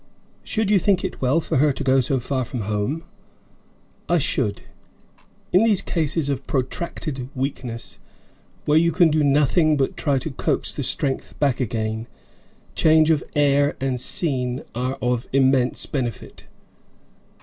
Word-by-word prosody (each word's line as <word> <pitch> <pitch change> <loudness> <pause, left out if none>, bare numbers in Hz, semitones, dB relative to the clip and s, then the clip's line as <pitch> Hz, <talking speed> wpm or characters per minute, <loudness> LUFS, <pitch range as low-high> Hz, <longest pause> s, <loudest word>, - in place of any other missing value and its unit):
"Should 215 -2 -1
you 205 - +5
think 185 0 +1
it - - -6
well 135 +5 +2
for 165 - -1
her 145 +2 +4
to 140 - -5
go 135 0 +3
so 130 +1 +1
far 130 +2 -2
from 125 0 -5
home?" 105 +10 -2 1.1
"I 175 - +4
should. 115 -8 0 0.9
In 185 +4 +5
these 215 -4 +3
cases 160 -2 -1
of 140 -1 -3
protracted 130 0 -3
weakness, 130 -3 -5 0.7
where 150 +1 +4
you 170 +1 +2
can 165 0 +4
do 155 0 +2
nothing 150 +2 +3
but 135 -1 0
try 140 -3 0
to 145 +4 -4
coax - - -1
the - - -4
strength 135 -2 -1
back 140 -4 +1
again, 110 -2 -2 0.7
change 160 0 +4
of 155 -3 +1
air 145 0 +3
and 130 -2 -2
scene 130 -5 0
are 125 +2 -2
of 125 0 0
immense 130 -2 +2
benefit." 120 -6 -5
135 Hz, 150 wpm, -22 LUFS, 125-155 Hz, 1.1 s, you